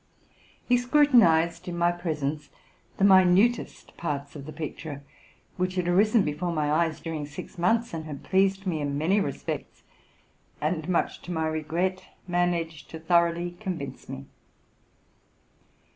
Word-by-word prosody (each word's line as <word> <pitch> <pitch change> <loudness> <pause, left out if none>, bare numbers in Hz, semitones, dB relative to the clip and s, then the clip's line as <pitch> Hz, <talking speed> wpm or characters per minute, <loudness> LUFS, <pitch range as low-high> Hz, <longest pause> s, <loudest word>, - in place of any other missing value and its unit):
He 245 - +4
scrutinized, 245 - +4
in 175 -1 -4
my 170 0 +3
presence, 155 -4 -3 0.5
the - - 0
minutest 195 +4 +4
parts 145 -3 -4
of 140 -1 -8
the - - -6
picture, 150 -2 -6 0.5
which 185 0 -1
had 180 -2 -1
arisen 205 +4 +4
before 155 +3 -2
my 150 -3 0
eyes 160 0 +1
during 155 -3 -4
six 150 - -9
months, 230 +7 +1
and 160 -1 -4
had 150 -3 -7
pleased 195 +1 +2
me 165 -5 -1
in 140 -1 -2
many 175 +8 +2
respects, 140 -9 -4 0.8
and, 155 +2 -2
much 175 - 0
to 180 - -8
my 160 -2 -1
regret, 165 +4 -1 0.2
managed 170 -4 -1
to 160 - -8
thor 170 +1 +4
oughly 175 +1 -6
convince 160 -13 -6
me. 135 +1 -7
170 Hz, 145 wpm, -27 LUFS, 155-185 Hz, 0.8 s, He